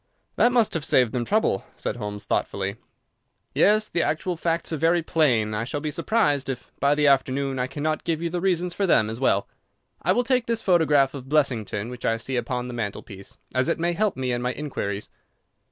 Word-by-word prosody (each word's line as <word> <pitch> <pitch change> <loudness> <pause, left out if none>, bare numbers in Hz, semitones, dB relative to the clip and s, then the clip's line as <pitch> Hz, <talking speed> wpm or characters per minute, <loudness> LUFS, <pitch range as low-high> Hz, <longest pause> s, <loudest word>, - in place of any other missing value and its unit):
"That 240 - +4
must 235 -3 +2
have 165 - -2
saved 125 -5 +3
them 120 -2 -1
trouble," 210 - +1
said - - -4
Holmes, 105 0 -5
thoughtfully. 100 +1 -2 0.8
"Yes, 215 +1 +4
the 170 - 0
actual 175 +4 -1
facts 165 0 -1
are - - -1
very 165 +3 +2
plain, 135 -11 +2
and 110 - -4
I 105 - -1
shall 135 +5 -3
be 150 +1 -3
surprised 155 -5 +1
if 130 - -6
by 140 +1 +3
the 150 0 +2
afternoon 135 -1 +2
I 125 - 0
cannot 155 +3 -2
give 165 -2 -1
you 170 0 -3
the 175 0 -2
reasons 180 -2 0
for 200 +1 0
them 110 -10 +3
as 115 - -5
well. 100 -7 +2 0.5
I - - +2
will 245 - +2
take 250 -1 +1
this 230 -1 -1
photograph 150 -7 +3
of 135 -2 -8
Blessington, 120 -7 0
which 125 -1 -9
I 115 - +1
see 130 +3 -4
upon 125 +1 -2
the 125 - -6
mantelpiece, 100 -3 -6 0.2
as 130 0 +1
it - - +1
may 170 +1 0
help 205 -1 0
me 130 -1 -1
in 120 0 -1
my 125 +1 -1
inquiries." 105 -9 -4
140 Hz, 215 wpm, -24 LUFS, 120-170 Hz, 0.8 s, That